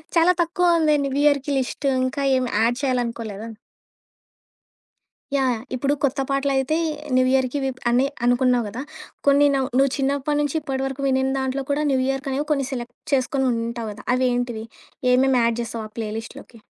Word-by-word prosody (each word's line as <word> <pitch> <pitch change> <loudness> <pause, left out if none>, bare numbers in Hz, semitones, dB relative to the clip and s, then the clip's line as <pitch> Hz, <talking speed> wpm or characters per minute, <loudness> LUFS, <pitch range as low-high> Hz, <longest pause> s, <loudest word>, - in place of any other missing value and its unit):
చాలా 335 +1 +5
తక్కువ 345 0 +2
ఉంది 305 -2 +3
న్యూ 275 -1 -2
ఇయర్‌కి 285 -1 +2
లిస్ట్ 265 +2 -3 0.2
ఇంకా 260 +2 -2
ఏమి 255 -1 0
యాడ్ 230 +2 +3
చేయాలనుకోలేదా? 230 -5 -2 1.9
యాహ్! 265 -2 +2
యహ్! 225 - -5
ఇప్పుడు 275 +3 0
కొత్త 280 0 +1
పాటలయితే 275 +1 +1 0.4
న్యూ 255 - +5
ఇయర్‌కి 260 +1 +1
ఇవి 270 -1 -1
ప్ - - -20 0.4
అనుకున్నావు 245 -1 +3
కదా! 230 +5 -6 0.5
కొన్ని 285 +1 +6
నవ్ 265 -1 0
నువ్వు 275 0 +4
చిన్నప్పటి 280 +1 0
నుంచి 290 +1 -2
ఇప్పటి 270 -2 -3
వరకు 270 0 -4
వినీన 265 0 +1
దాంట్లో 265 +1 -2
కూడా 290 +2 +1
న్యూ 265 - +2
ఇయర్‌కి 270 +1 -2
అనేవి 285 +3 -2
కొన్ని 275 -3 -1
సెలెక్ట్ 245 -2 -5 0.2
చేసుకొని 265 0 +1
ఉంటావు 230 -1 -3
కదా. 205 - -11
అవి 255 0 +2
ఏంటివి? 240 -2 -2 0.5
ఏమేమి 260 0 +4
యాడ్ 230 0 +1
చేస్తావు 230 -1 -5
ఆ - - -38
ప్లే 220 -2 -3
లిస్ట్‌లోకి? 230 0 -12
265 Hz, 170 wpm, -23 LUFS, 245-280 Hz, 1.9 s, కొన్ని